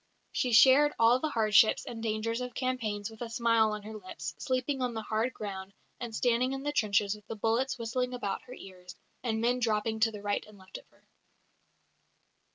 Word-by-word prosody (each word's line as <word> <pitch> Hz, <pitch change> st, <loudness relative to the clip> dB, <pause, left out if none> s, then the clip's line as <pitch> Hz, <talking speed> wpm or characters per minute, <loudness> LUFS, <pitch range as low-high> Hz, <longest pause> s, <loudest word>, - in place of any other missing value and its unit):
She 250 Hz, -, -1 dB
shared 270 Hz, +6 st, +6 dB
all 230 Hz, +2 st, +5 dB
the 310 Hz, -, -1 dB
hardships 220 Hz, -3 st, +4 dB
and 225 Hz, -1 st, -7 dB
dangers 225 Hz, +2 st, -2 dB
of 250 Hz, 0 st, -6 dB
campaigns 225 Hz, -5 st, -2 dB
with 220 Hz, -, -14 dB
a 235 Hz, -, -4 dB
smile 230 Hz, -2 st, +2 dB
on 210 Hz, -1 st, -5 dB
her 215 Hz, +1 st, -8 dB
lips, 200 Hz, -4 st, -7 dB
sleeping 260 Hz, +1 st, -1 dB
on 245 Hz, -2 st, -1 dB
the 220 Hz, -, -4 dB
hard 220 Hz, +4 st, -1 dB
ground, 195 Hz, -3 st, -7 dB, 0.3 s
and 235 Hz, -3 st, -5 dB
standing 250 Hz, +2 st, +1 dB
in 270 Hz, 0 st, -5 dB
the 290 Hz, -, -1 dB
trenches 205 Hz, -6 st, +1 dB
with 210 Hz, 0 st, -13 dB
the 225 Hz, -, -5 dB
bullets 235 Hz, +6 st, 0 dB
whistling 250 Hz, +2 st, -2 dB
about 200 Hz, -5 st, -3 dB
her 250 Hz, -, -10 dB
ears, 180 Hz, -4 st, -12 dB, 0.3 s
and 225 Hz, -3 st, -1 dB
men 245 Hz, +2 st, +1 dB
dropping 220 Hz, -1 st, 0 dB
to 220 Hz, -2 st, +1 dB
right 205 Hz, 0 st, -1 dB
and 210 Hz, -1 st, -15 dB
left 190 Hz, 0 st, -10 dB
of -, -, -22 dB
her. -, -, -29 dB
225 Hz, 195 wpm, -30 LUFS, 215-250 Hz, 0.3 s, shared